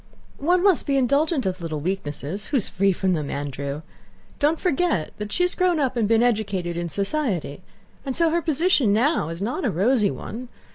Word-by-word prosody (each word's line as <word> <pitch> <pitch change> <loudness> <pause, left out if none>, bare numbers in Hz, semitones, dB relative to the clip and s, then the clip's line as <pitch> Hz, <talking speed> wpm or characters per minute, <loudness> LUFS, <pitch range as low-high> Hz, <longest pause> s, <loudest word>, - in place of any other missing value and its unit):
"One 350 +5 +2
must 390 -5 +3
be 275 -1 +2
indulgent 280 +3 +2
to 190 - 0
little 160 -3 -4
weaknesses; 165 +1 -3
who 290 - +1
is 225 - +1
free 195 +1 +2
from 190 +1 0
them, 155 -5 -1
Andrew? 140 +1 -4 0.6
Don't 305 +2 +2
forget 340 - 0
that 210 0 -5
she 355 - +1
has 360 - +2
grown 360 -3 +2
up 265 -3 0
and 225 -3 +1
been 225 +1 +4
educated 200 -7 0
in 170 0 -3
society, 200 - -2 0.4
and 265 -2 -3
so 335 -1 +2
her 340 +1 +1
position 315 - +2
now 240 - +2
is 165 +3 -5
not 250 - -2
a 245 - +2
rosy 210 +4 +2
one. 245 +6 -6
225 Hz, 195 wpm, -23 LUFS, -, 0.6 s, been